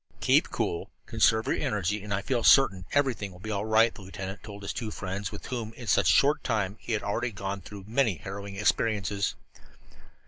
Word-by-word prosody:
"Keep - - +3
cool, 85 - -2 0.2
conserve 110 0 +3
your - - 0
energy, 105 0 -1
and 105 - -8
I 100 0 0
feel 125 -1 0
certain 95 -11 +5
everything 130 -8 0
will 90 - -14
be 110 +3 -5
all 100 0 -1
right," 110 +1 +4
the - - -12
lieutenant 95 +1 -7
told 100 -2 -10
the - - -6
two 110 +1 -3
friends 95 0 -4
with - - -8
whom, 115 -3 -4
in 120 +1 -10
such - - +3
a - - +6
short 145 +2 +3
time, 105 -4 -1
he 115 - -1
already 105 +4 -2
had 115 - -7
gone 100 0 -4
through 100 +2 -10
so 100 - -15
many 115 -4 +2
harrowing 100 +2 -7
experiences. 105 -2 0
105 Hz, 210 wpm, -28 LUFS, 100-115 Hz, 0.2 s, a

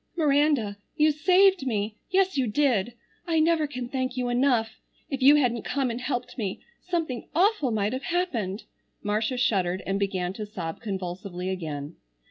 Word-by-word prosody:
"Miranda, 285 -9 +2 0.2
you 305 0 +4
saved 365 +1 +4
me. 210 -2 -1
Yes, 380 0 +2
you 265 -3 +1
did. 235 -2 +1 0.3
I 325 -2 +2
never 315 -1 +3
can 250 -4 -5
thank 255 0 -3
you 250 -1 0
enough. 240 -3 +1 0.3
If 270 -1 -2
you 280 +3 +8
hadn't 245 -5 +2
come 270 -3 -1
and 235 +2 -5
helped 250 0 -3
me 195 -4 -3 0.2
something 330 -9 -3
awful 370 - +3
might 215 0 0
have 260 +1 -4
happened!" 235 - -1 0.4
Marcia 215 +5 0
shuddered 190 -7 +1
and 195 +1 -1
began 185 -2 -1
to 215 +2 -5
sob 170 -6 -5
convulsively 185 -2 -4
again. 155 -4 -5
245 Hz, 160 wpm, -26 LUFS, 200-290 Hz, 0.4 s, you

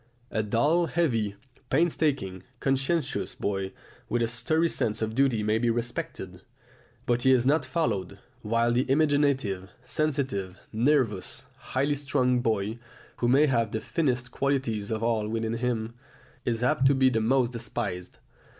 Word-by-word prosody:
A 110 - +1
dull, 145 +11 +2
heavy, 115 -13 0 0.3
painstaking, 145 - +1 0.2
conscientious 135 +3 0
boy 95 -1 -2 0.4
with 120 0 +1
a - - +1
sturdy 140 +8 +1
sense 110 -8 -1
of 110 0 -2
duty 125 -4 +2
may 110 +1 +2
be 120 0 +1
respected, 120 +1 -4 0.6
but 120 0 +1
he 130 - +4
is 125 -2 +4
not 150 +4 +3
followed; 100 - -1 0.2
while 115 +2 +1
the 125 +2 +1
imaginative, 140 -10 +2
sensitive, 130 -10 -1 0.2
nervous, 115 -5 +1
highly 140 +3 -1
strung 130 -3 +1
boy, 110 -1 -1 0.4
who 120 - 0
may 135 +5 +5
have 115 -6 +1
the 110 - 0
finest 125 0 -1
qualities 130 -8 -1
of 110 0 -2
all 115 -2 +1
within 115 0 -1
him, 115 -2 -2 0.5
is 120 0 -1
apt 135 0 +3
to 140 - +4
be 130 -1 +4
the 110 -2 +1
most 125 +1 +2
despised. 110 -6 -5
120 Hz, 145 wpm, -27 LUFS, 110-135 Hz, 0.6 s, may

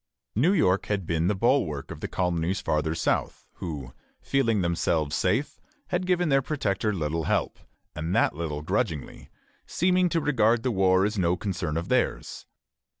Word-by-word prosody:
New 145 - +3
York 100 - +2
had 100 -3 -1
been 80 0 0
the 105 - +1
bulwark 95 - +1
of - - -7
the - - -4
colonies 90 +1 -1
farther 80 +1 -1
south, - - -1
who, 70 -7 -6 0.3
feeling 115 -7 +1
themselves 80 -3 0
safe, 140 +11 0 0.3
had 180 0 -1
given 180 -2 +2
their 135 -1 +4
protector 110 -7 -1
little 80 -3 -2
help, - - -1 0.4
and 80 +4 -2
that - - +3
little 75 -1 -4
grudgingly, 85 - -3 0.4
seeming 180 0 +2
to 165 - +1
regard 120 -6 +2
the 130 - +1
war 95 -2 +3
as 105 0 -1
no 90 0 +2
concern 85 -6 -3
of 85 - -3
theirs. - - -1
95 Hz, 160 wpm, -26 LUFS, 80-130 Hz, 0.4 s, their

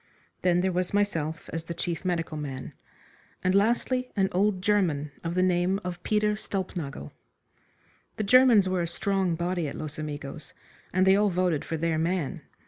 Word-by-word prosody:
Then 180 -1 +3
there 190 +1 +1
was 180 +2 -1
myself 165 -6 -1
as 165 0 -3
the 170 - -5
chief 170 -1 -3
medical 170 -3 -1
man, 140 -3 -5 0.7
and 185 - +2
lastly 240 +5 +1
an 195 -2 +2
old 190 0 +1
German 170 -9 +1
of 170 0 -3
the 185 - +3
name 185 +1 +2
of 180 0 -5
Peter 210 +1 +1
Stulpnagel. 175 - -5 1.0
The 215 - -2
Germans 235 -3 +6
were 185 -1 0
a 170 - -1
strong 190 0 0
body 175 -1 -1
at - - -6
Los 155 -1 -6
Amigos, 150 -1 -6 0.4
and 185 +1 +3
they 190 0 +6
all 205 +1 +3
voted 180 -4 +1
for 165 - -3
their 160 0 0
man. 170 -1 -1
180 Hz, 170 wpm, -27 LUFS, 160-195 Hz, 1.0 s, Germans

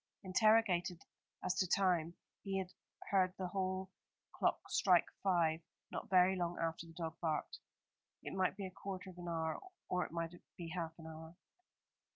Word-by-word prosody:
Interrogated 185 -3 +4 0.4
as 185 - +2
to 185 - +3
time, 175 -3 +3 0.3
he 195 -1 -2
had 185 -1 -2 0.4
heard 185 -2 +4
the 185 -1 -2
hall 190 0 -1 0.4
clock - - +2
strike 180 -3 +5 0.2
five 170 -4 +3 0.3
not - - -4
very 185 0 +6
long 175 -1 -1
after 165 0 -1
the 165 - -12
dog 165 -1 -4
barked. 155 -3 -1 0.6
It - - -5
might 190 +1 +1
be 200 - -3
a 185 - -5
quarter 190 0 -6
of 180 - -14
an 175 - -6
hour, 160 -1 -1 0.3
or 180 0 +2
it - - -6
might 165 0 -2 0.2
be 170 -2 -5
half 165 -1 -3
an 165 - -11
hour. 160 +1 -9
180 Hz, 170 wpm, -37 LUFS, 165-190 Hz, 0.6 s, very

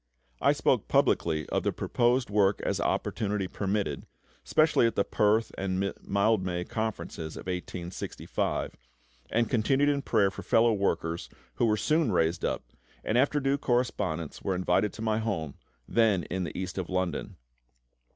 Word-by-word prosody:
I - - +5
spoke - - +1
publicly 80 -3 +2
of - - 0
the - - 0
proposed 120 -1 +1
work 100 -1 +3
as - - 0
opportunity 100 -2 -1
permitted, 95 -7 -2 0.4
specially 155 -6 +4
at 115 - -2
the 100 - +3
Perth 105 +3 +2
and 95 0 -1
Mildmay 100 -3 +1
Conferences 105 -7 -4
of - - -6
1865, 90 -1 -3 0.6
and 115 0 +2
continued 135 +4 +2
in 140 -1 +1
prayer 105 -7 +2
for 95 - -8
fellow 115 0 +3
workers, 85 -4 -1 0.3
who 120 - +3
were 105 -1 +2
soon 155 0 +2
raised 85 -1 +1
up, - - -1 0.4
and 110 - -1
after 140 +4 +3
due 140 0 +1
correspondence 105 - -1
were 95 - -1
invited 90 +3 +1
to 110 - -7
my 110 -1 +1
home, 95 -10 -2 0.3
then 110 -6 +3
in 95 0 -3
the - - -6
East 95 0 -4
of 90 - -4
London. 90 -1 -2
100 Hz, 150 wpm, -28 LUFS, 90-115 Hz, 0.6 s, I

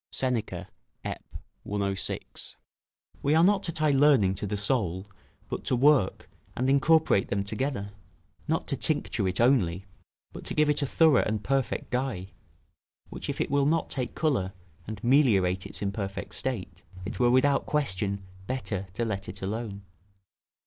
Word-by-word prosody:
Seneca, 125 -4 -2 0.4
Ep., - - -4 0.4
106.] 100 -2 -3 0.6
We 145 +2 +2
are 165 - +6
not 195 +1 +4
to 170 - -2
tie 155 -2 +2
learning 135 -9 +5
to 100 - -4
the 105 +1 -2
soul, 100 -4 0 0.4
but - - -4
to - - +2
work 135 -6 +3 0.3
and 125 - 0
incorporate 155 -6 +4
them 100 0 -1
together: 100 -1 -3 0.6
not - - 0
to - - 0
tincture 95 - 0
it 95 0 -2
only, 100 -8 +3 0.5
but - - -8
to - - -3
give 150 -1 +4
it 150 - 0
a 140 - 0
thorough 160 -1 +5
and 105 -1 -2
perfect 135 -1 -1
dye; 125 -8 -2 0.8
which, - - -6
if - - -3
it - - -1
will 140 0 +3
not 165 +2 +1
take 125 -3 -3
colour, 125 - 0 0.3
and 110 -1 -7
meliorate 105 -9 +3
its - - -6
imperfect 100 0 -4
state, 95 -9 -4 0.2
it 95 - -5
were 120 -1 +4
without 135 +3 +3
question 100 -9 -1 0.2
better 110 -7 -3
to 115 +4 -1
let 100 -3 -3
it 95 +1 -8
alone. 100 0 -4
120 Hz, 155 wpm, -28 LUFS, 100-140 Hz, 0.8 s, are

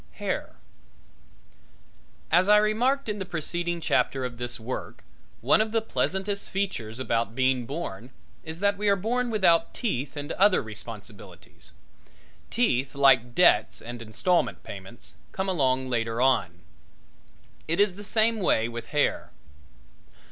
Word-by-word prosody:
HAIR - - -4 1.8
As 180 +3 +4
I 210 - +8
remarked 240 +6 +1
in 210 -1 -3
the - - -2
preceding 175 0 -3
chapter 135 -4 0
of 120 -1 -7
this 120 0 -3
work, 120 +3 -6 0.4
one 135 - +4
of 215 0 -1
the 225 - +2
pleasantest 200 -2 -2
features 130 - -3
about 115 -2 -1
being 130 -2 +1
born 130 - -6 0.3
is 160 +2 -7
that 200 0 +2
we 210 -1 +2
are 200 - +5
born 240 +5 -1
without 170 -7 +2
teeth 150 - -3
and 145 +2 -5
other 195 0 +4
responsibilities. 110 -1 -11 0.8
Teeth, 135 - 0
like 125 -4 +4
debts 110 -12 +4
and 120 0 -8
installment 145 +11 0
payments, 100 +4 -10 0.2
come 190 0 -2
along 130 -7 +1
later 115 -2 -1
on. 125 -10 +2 1.1
It 165 +4 0
is 205 -2 +4
the 205 +3 -10
same 220 +2 +1
way 115 - +2
with 120 0 -7
hair. 145 -1 0
150 Hz, 135 wpm, -26 LUFS, 120-200 Hz, 1.8 s, I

